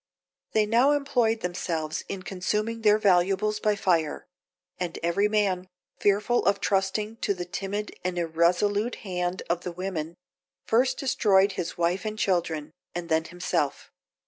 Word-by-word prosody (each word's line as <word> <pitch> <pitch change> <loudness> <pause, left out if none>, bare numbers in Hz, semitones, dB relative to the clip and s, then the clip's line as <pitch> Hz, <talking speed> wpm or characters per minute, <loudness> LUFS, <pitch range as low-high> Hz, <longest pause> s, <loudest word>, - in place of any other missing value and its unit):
They 215 -1 +4
now 240 +7 +4
employed 245 -6 +1
themselves 165 -3 -3
in 190 -1 -5
consuming 210 +5 -2
their 210 -1 +5
valuables 200 +1 +2
by 210 -1 +2
fire; 170 -6 0 0.5
and 175 -2 -3
every 170 +5 +2
man, 190 -4 0 0.3
fearful 205 +4 +2
of 200 0 +3
trusting 200 +3 0
to 200 - 0
the 175 -1 -5
timid 200 +3 -4
and 180 0 -2
irresolute 175 +7 +1
hand 180 -1 -2
of 170 0 0
the 180 - -5
women, 170 -2 -4 0.5
first 255 +3 +2
destroyed 200 -7 +3
his 175 -3 -4
wife 175 +2 +1
and 215 0 -4
children, 170 -7 0 0.2
and 175 -1 -4
then 160 0 +2
himself. 175 -4 -2
190 Hz, 145 wpm, -27 LUFS, 175-210 Hz, 0.5 s, their